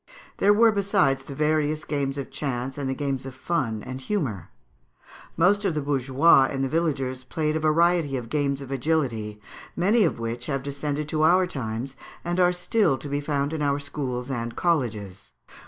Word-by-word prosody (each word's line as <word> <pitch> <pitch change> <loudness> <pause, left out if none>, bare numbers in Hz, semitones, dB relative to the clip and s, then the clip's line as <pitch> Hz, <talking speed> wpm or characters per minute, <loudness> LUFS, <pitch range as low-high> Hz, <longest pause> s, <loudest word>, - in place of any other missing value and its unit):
There 205 - +4
were, 225 +2 +6
besides, 195 -10 +2
the 140 - -8
various 155 0 +1
games 140 -2 -2
of 140 - -5
chance 130 -2 -3
and 140 -2 -3
the 130 - -1
games 135 -2 -3
of 130 - -8
fun 130 -8 -2
and 130 +1 -6
humour. 130 - -2 0.9
Most 205 +3 +4
of 185 -5 0
the 150 - 0
bourgeois 135 +1 +4
and 135 -1 -2
the - - +1
villagers 135 -5 -1
played 155 +3 -1
a - - +1
variety 160 -2 +2
of 120 -2 -6
games 140 0 -1
of 135 - -10
agility, 125 -7 -1 0.4
many 210 +6 +3
of 165 - +1
which 115 +1 -4
have 135 -2 -2
descended 145 +1 -3
to 155 0 0
our 180 +4 +5
times, 130 -4 -4 0.3
and 175 +1 -1
are 180 -1 +5
still 180 -3 +1
to 145 - -8
be 145 +1 -1
found 145 0 -1
at 160 - -3
our 140 -1 +1
schools 135 -3 -4
and 115 -2 -3
colleges. 110 - -2
140 Hz, 185 wpm, -25 LUFS, 130-160 Hz, 0.9 s, were